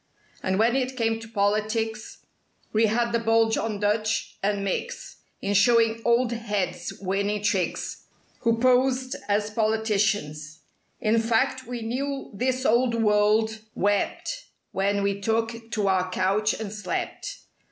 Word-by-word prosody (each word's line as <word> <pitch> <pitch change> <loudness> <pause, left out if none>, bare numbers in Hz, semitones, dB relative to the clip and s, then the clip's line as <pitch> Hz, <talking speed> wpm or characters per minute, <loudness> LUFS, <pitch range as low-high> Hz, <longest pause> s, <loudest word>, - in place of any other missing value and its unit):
And 190 0 0
when 230 +4 +3
it 260 -1 -1
came 225 -2 +1
to 225 - -9
politics, 215 +1 -1 0.5
We 220 +1 +4
had 235 +2 +1
the 235 - +1
bulge 225 0 +3
on 215 -2 -2
Dutch 215 +2 0
and 200 0 0
Micks 195 - -4 0.3
In 200 - 0
showing 230 +1 +4
"old 235 +1 +3
heads" 205 -6 -2
winning 200 +2 -1
tricks— 190 -5 -1 0.3
(Who 230 0 +2
posed 255 +1 +2
as 210 +1 +1
politicans) 210 -8 0 0.2
— - - -43
In 225 +1 +4
fact 255 +3 +1
we 240 -2 -5
knew 270 +4 -3
this 255 +4 -1
old 235 +1 +3
world 220 0 +2 0.2
wept 205 - -1 0.3
When 200 +1 0
we 200 0 -1
took 225 +1 -1
to 210 -3 0
our 185 -1 +2
couch 195 +4 +1
and 215 -2 -5
slept. 210 -3 -4
220 Hz, 140 wpm, -25 LUFS, 205-230 Hz, 0.5 s, We